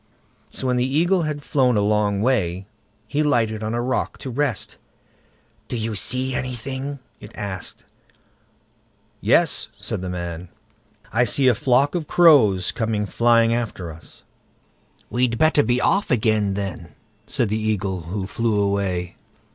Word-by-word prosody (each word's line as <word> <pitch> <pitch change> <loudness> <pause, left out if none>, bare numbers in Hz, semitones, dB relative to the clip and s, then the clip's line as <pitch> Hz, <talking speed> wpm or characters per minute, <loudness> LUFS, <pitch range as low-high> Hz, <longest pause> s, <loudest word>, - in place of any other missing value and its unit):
So - - -6
when 125 -1 +1
the 130 +3 0
Eagle 175 +3 +3
had 145 -1 -5
flown 130 -6 +2
a - - +3
long 105 -1 +1
way, 95 -7 0 0.4
he 145 +7 0
lighted 115 -7 +1
on 110 +1 -2
a 120 - 0
rock 130 +1 -2
to 130 - -5
rest. 135 -2 -2 0.9
"Do 120 - -3
you 110 0 -2
see 130 +5 0
anything?" 130 +3 -4 0.2
it 105 - -12
asked. 100 -3 -6 1.3
"Yes", - - +3
said - - -4
the 95 - -4
man, 85 -1 -5 0.6
"I 120 +2 +3
see 135 +2 +2
a 125 - +6
flock 130 +5 +2
of 170 -4 -3
crows 125 - +5
coming 110 -3 -1
flying 115 +2 +3
after 105 -8 -3
us." 80 +1 -13 0.9
"We'd 120 -1 +1
better 155 +1 +4
be 120 +1 +1
off 200 +9 +1
again, 105 -4 +1
then", 95 -4 -5 0.3
said 120 -5 0
the 110 +1 -1
Eagle, 100 -4 -1
who 95 +3 -4
flew 110 +1 0
away. 100 -3 -1
115 Hz, 145 wpm, -22 LUFS, 100-130 Hz, 1.3 s, a